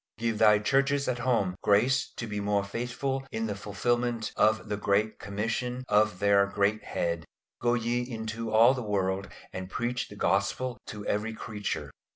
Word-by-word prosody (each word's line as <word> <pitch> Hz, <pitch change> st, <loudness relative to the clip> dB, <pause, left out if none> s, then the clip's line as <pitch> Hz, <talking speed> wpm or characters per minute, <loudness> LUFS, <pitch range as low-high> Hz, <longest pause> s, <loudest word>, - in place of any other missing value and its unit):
Give 115 Hz, -1 st, -1 dB
thy 105 Hz, -1 st, +7 dB
Churches 135 Hz, +6 st, +2 dB
at 125 Hz, -1 st, -1 dB
home 115 Hz, -7 st, +1 dB
grace 125 Hz, +6 st, +3 dB
to 115 Hz, -, -3 dB
be 105 Hz, -2 st, -4 dB
more 100 Hz, 0 st, +1 dB
faithful 125 Hz, +6 st, -3 dB
in 110 Hz, 0 st, -2 dB
the 105 Hz, -, -2 dB
fulfilment 115 Hz, +3 st, -1 dB
of 110 Hz, -1 st, +3 dB
the 105 Hz, -, -1 dB
great 105 Hz, +1 st, +1 dB
commission 115 Hz, +5 st, -2 dB
of 105 Hz, -2 st, +3 dB
their 100 Hz, 0 st, +4 dB
Great 100 Hz, +2 st, +1 dB
Head 85 Hz, -1 st, -2 dB, 0.4 s
"Go 120 Hz, 0 st, +3 dB
ye 120 Hz, +1 st, 0 dB
into 115 Hz, -2 st, -4 dB
all 115 Hz, +4 st, +7 dB
the 130 Hz, -, -3 dB
world 100 Hz, -2 st, -1 dB, 0.3 s
and 95 Hz, 0 st, -5 dB
preach 120 Hz, +3 st, -2 dB
the 105 Hz, -, -11 dB
Gospel 100 Hz, +6 st, 0 dB
to 105 Hz, -1 st, -7 dB
every 110 Hz, +2 st, -1 dB
creature!" 105 Hz, -2 st, -4 dB
110 Hz, 170 wpm, -29 LUFS, 100-120 Hz, 0.4 s, thy